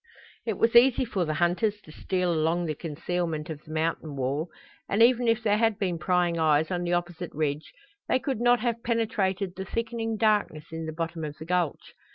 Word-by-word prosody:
It 215 -4 -1
was 230 +1 +2
easy 255 +1 +6
for 190 -6 -1
the 155 -1 -2
hunters 185 +6 +1
to 155 - -14
steal 180 +2 -1
along 165 +2 +1
the 155 - -1
concealment 165 0 -3
of 150 -1 -7
the 155 - -12
mountain 160 -1 -2
wall, 140 +5 -2 0.4
and 210 +3 +4
even 245 0 +4
if 230 0 +2
there 210 -1 +2
had 225 -3 +2
been 180 -4 -1
prying 175 0 +1
eyes 155 0 +3
on 175 -1 -1
the 175 0 -1
opposite 175 0 -2
ridge 150 0 -2 0.4
they - - +3
could 260 -3 -3
not 240 -1 +4
have 235 -1 -1
penetrated 205 -5 0
the 190 - -4
thickening 225 0 -2
darkness 210 -8 +1
in 165 0 -5
the - - -3
bottom 165 0 -4
of 150 -1 -5
the 160 - -8
gulch. 175 -3 -1
175 Hz, 205 wpm, -27 LUFS, 160-220 Hz, 0.4 s, easy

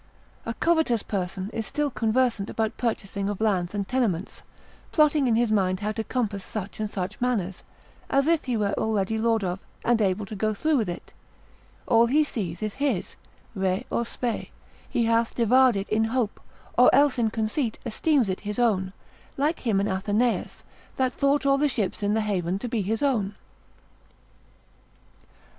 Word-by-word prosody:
A 230 - -2
covetous 320 -10 +2
person 190 0 -3
is 225 - -3
still 295 -1 -1
conversant 230 -3 +1
about 220 -1 -1
purchasing 200 -4 -2
of 205 - -4
lands 195 -4 0
and 200 -1 -2
tenements, 215 -8 -1 0.5
plotting 300 -3 +4
in 230 - +3
his 235 -1 +2
mind 185 -2 +1
how 210 +1 -1
to 220 +1 -3
compass 215 -6 -2
such 205 -1 -6
and 215 -1 -2
such 195 +2 -5
manors, 205 -7 -1 0.5
as 275 0 +3
if 330 0 +2
he 250 -3 0
were 200 -2 0
already 220 0 0
lord 225 -1 +2
of, 180 0 -2 0.3
and 235 -2 +3
able 200 +1 +1
to 210 - -7
go 215 +1 0
through 310 +7 +2
with 220 -7 0
it; 175 - -7 0.7
all 230 0 +5
he 295 +5 +4
sees 200 - -4
is 215 -1 -2
his, 260 -11 -1 0.4
re 190 +2 -1
or 235 - +1
spe, 235 0 -3 0.4
he 235 - +1
hath 230 0 +1
devoured 250 +1 +5
it 195 0 -3
in 220 +1 +2
hope, 225 -2 -1 0.3
or 250 - +7
else 280 -2 +4
in 225 -2 +2
conceit 220 +2 -1
esteems 260 +1 +2
it 185 -1 -2
his 210 0 -5
own: 195 -6 +1 0.4
like 300 +4 +1
him 220 -6 +1
in 200 - +1
Athenaeus, 210 +5 0 0.3
that 260 -1 +1
thought 280 0 +1
all 275 0 +4
the 295 0 +3
ships 215 -7 -2
in 205 +1 +1
the 220 - +2
haven 190 -4 -1
to 245 - -5
be 230 -2 -1
his 220 +6 -1
own. 210 -8 +1
220 Hz, 175 wpm, -26 LUFS, 200-250 Hz, 0.7 s, or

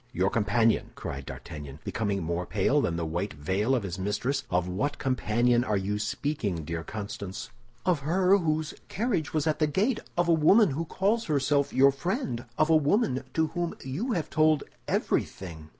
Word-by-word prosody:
"Your 95 -5 +1
companion!" 115 +1 +2
cried 70 -1 -6
D'Artagnan, 75 -4 -8
becoming 100 -4 -1
more 85 +2 -2
pale - - +2
than 85 - 0
the 85 -1 -2
white 85 +6 -2
veil 95 - 0
of 120 - -1
his 95 -1 -5
mistress. 120 +8 -1
"Of 90 0 +1
what 140 +11 -1
companion 120 -1 +2
are 105 -5 0
you 100 +2 -1
speaking, 105 - -2
dear 80 +1 -4
Constance?" 100 0 -6 0.3
"Of 175 -5 +2
her 180 +6 +3
whose 155 -2 -1
carriage 200 - -1
was 155 -2 0
at 155 -1 0
the 155 - +3
gate; 210 - +1 0.2
of 175 0 +2
a 170 - +5
woman 175 +5 +5
who 160 +5 -2
calls 210 +7 0
herself 140 -1 +1
your 135 +2 +6
friend; 140 - -3
of 155 - +3
a - - +7
woman 150 - +2
to 160 0 +3
whom 175 +1 -3
you 175 - -2
have 165 -6 -2
told 155 -1 +3 0.2
everything." 80 -4 -2
130 Hz, 180 wpm, -28 LUFS, 95-160 Hz, 0.3 s, a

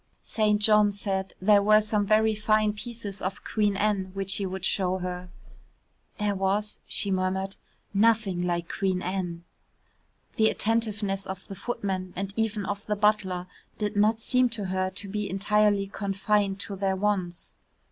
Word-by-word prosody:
St. 210 -1 +1
John 210 -1 +5
said 195 -1 -2
there 205 +1 +5
were 215 +1 +6
some 210 -1 0
very 220 +1 +4
fine 215 0 +2
pieces 210 -2 -6
of 185 0 -4
Queen 205 -2 0
Anne 205 -2 +1
which 195 0 +1
he 195 - -1
would 190 0 -3
show 185 -1 +1
her. 180 0 -5 0.9
"There 210 -1 0
was," 200 +2 0
she 200 - -2
murmured, 190 +1 -1 0.4
"nothing 205 -3 +3
like 175 -1 -1
Queen 190 -1 -1
Anne." 175 -2 -3 0.9
The 220 0 +5
attentiveness 210 -3 0
of 190 0 -7
the - - -7
footman 190 -3 -3
and 195 +1 -4
even 220 -2 -1
of 205 0 -3
the 210 - +1
butler 205 -4 +1 0.3
did 210 0 -2
not 215 +2 +3
seem 250 +2 +2
to 220 -4 -4
her 185 0 -1
to 200 - -4
be 210 +1 -3
entirely 205 +1 +2
confined 200 0 0
to 200 - -5
their 190 0 0
wants. 190 -3 -2
200 Hz, 155 wpm, -27 LUFS, 190-210 Hz, 0.9 s, were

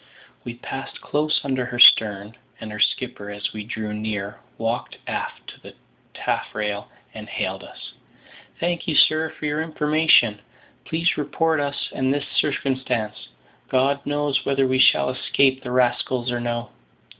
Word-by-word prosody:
We 120 - -6
passed 135 +2 -7
close 150 +1 0
under 130 -2 -1
her 120 - -5
stern; 105 -3 +6 0.2
and 110 - -7
her 105 - -7
skipper, 120 -5 -1
as 105 0 -4
we 105 -1 -5
drew 110 0 -5
near, 105 -1 -4 0.2
walked 115 +2 -3
aft - - -4
to - - -14
the - - -13 0.4
taffrail 105 -1 -2 0.3
and - - -9
hailed - - -3
us. - - -11 0.7
"Thank 175 0 -1
you, 160 - 0
sir, 155 +2 +4
for 155 - -8
your 150 +1 0
information; 150 -9 +3 0.4
please 165 +2 0
report 160 +2 +1
us 140 0 -3
and 130 0 0
this 145 0 -1
circumstance; 125 - -1 0.4
God 140 +2 +2
knows 145 -1 0
whether 135 -1 +2
we 130 0 +1
shall 130 - +5
escape 130 +1 +2
the 125 - -6
rascals 125 0 +1
or 120 - -1
no." 120 0 -3
130 Hz, 150 wpm, -23 LUFS, 110-145 Hz, 0.7 s, stern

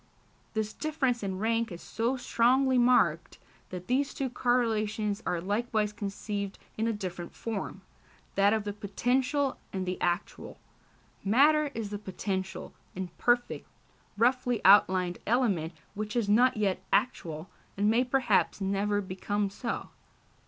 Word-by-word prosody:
This 215 0 -1
difference 275 -6 -1
in 190 -2 -3
rank 225 +2 0
is 175 - -7
so 235 +8 -2
strongly 255 +2 +3
marked, 240 -10 +3 0.3
that 180 -1 -7
these 270 +4 0
two 265 -3 -2
correlations 220 -4 0
are 175 - 0
likewise 210 +3 -1
conceived 200 -1 -4 0.2
in 220 +1 0
a - - +2
different 185 -5 -6
form 220 -4 -5 0.5
that 200 +1 +4
of 220 -1 +1
the 205 0 -4
potential 255 +7 0
and 190 -1 -3
the 185 0 -4
actual. 175 0 -2 0.7
Matter 295 +9 +4
is 215 -3 -4
the 205 - -4
potential, 190 -1 -4 0.2
imperfect, 240 +6 0 0.5
roughly 245 0 +2
outlined 185 -2 +5
element 205 -9 +1 0.2
which 215 +2 -4
is 235 -4 +1
not 245 +4 +4
yet 200 -3 0
actual, 165 -8 -1 0.3
and 205 +1 +2
may 230 +3 +4
perhaps 250 -7 +2
never 200 +1 0
become 200 +1 -2
so. 230 +3 -4
210 Hz, 130 wpm, -29 LUFS, 195-245 Hz, 0.7 s, outlined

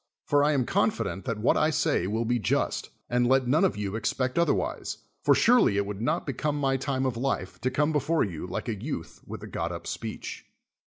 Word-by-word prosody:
For 145 0 +3
I 150 +1 +3
am 130 -4 +1
confident 200 - 0
that 115 -4 -2
what 105 - +3
I 155 - +3
say 120 - +1
will 110 +3 -1
be 120 +1 +1
just, - - 0 0.2
and 120 0 +2
let 130 0 +3
none 155 +8 +3
of 190 - +2
you 100 0 -3
expect 125 +6 -1
otherwise; 170 - 0 0.2
for - - +5
surely 240 - +4
it 100 - +1
would 100 0 -5
not 155 +8 0
become 145 +2 -1
my 135 -2 +1
time 135 0 -1
of 125 -3 -1
life 120 -7 -2
to 130 - +1
come 150 +4 +1
before 155 +2 +2
you 90 -4 -4
like 90 - -4
a 115 - 0
youth 110 - -5
with - - -7
a - - -6
got - - -3
up - - -6
speech. - - -6
130 Hz, 220 wpm, -27 LUFS, 110-150 Hz, 0.2 s, for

